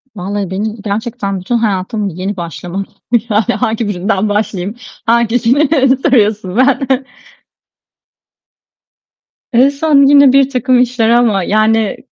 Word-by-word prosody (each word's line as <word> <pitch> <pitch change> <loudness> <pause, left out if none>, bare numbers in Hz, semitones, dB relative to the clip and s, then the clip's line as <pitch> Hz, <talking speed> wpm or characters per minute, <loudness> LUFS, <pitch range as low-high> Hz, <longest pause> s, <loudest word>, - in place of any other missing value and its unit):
Vallahi 195 0 -4
benim 210 +3 -4
gerçekten 200 -2 -4
bütün 210 +7 -2
hayatım 205 -1 -2
yeni 190 +3 -5
başlama. 175 +3 -5 0.5
Yani, 210 +1 +2 0.2
hangi 225 -2 -1
birinden 200 +1 -1
başlayayım? 205 -1 -2 0.3
Hangisini 235 +4 +2 0.3
soruyorsun, 210 -7 0
ben 265 +1 +2 2.7
En 250 +4 +5
son 280 -1 +2
yine 280 -2 +6
birtakım 260 -2 +2
işler 240 -2 0
ama, 230 -5 +2
yani, 215 +1 +1
220 Hz, 105 wpm, -13 LUFS, 200-250 Hz, 2.7 s, yine